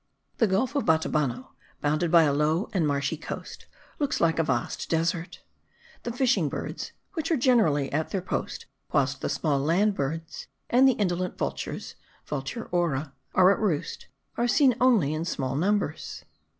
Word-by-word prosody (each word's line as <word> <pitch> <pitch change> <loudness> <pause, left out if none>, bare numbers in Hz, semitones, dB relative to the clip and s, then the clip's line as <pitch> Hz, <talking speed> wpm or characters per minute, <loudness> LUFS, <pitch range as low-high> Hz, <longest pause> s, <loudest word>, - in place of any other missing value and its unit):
The 225 - +4
gulf 215 +8 +1
of 280 - +1
Batabano, 150 -6 0 0.3
bounded 155 +3 0
by 170 0 +6
a 145 -2 +2
low 155 +8 +1
and 175 -6 +2
marshy 145 +2 -1
coast, - - -8 0.3
looks 290 -2 0
like 165 -1 +2
a - - +4
vast 130 -5 -2
desert. 165 +2 -1 0.6
The 240 - -4
fishing 235 - +2
birds, - - -5 0.2
which 320 -5 -3
are 325 - +2
generally 210 - +3
at 155 +2 0
their 190 -3 -2
post - - -4 0.3
whilst 135 -2 +1
the - - -1
small 145 -4 0
land 175 +9 +2
birds, 160 +1 -4 0.2
and 255 +2 +6
the 265 - +5
indolent 180 -4 -1
vultures 70 0 -4 0.3
(Vultur 145 - -4
aura.) 155 -5 0 0.2
are 185 +1 +7
at - - -4
roost, 185 -9 -2 0.3
are 240 - +2
seen 260 +1 +4
only 220 - +4
in 155 +1 -2
small 135 -6 -2
numbers. 180 -1 -1
165 Hz, 165 wpm, -27 LUFS, 145-210 Hz, 0.6 s, are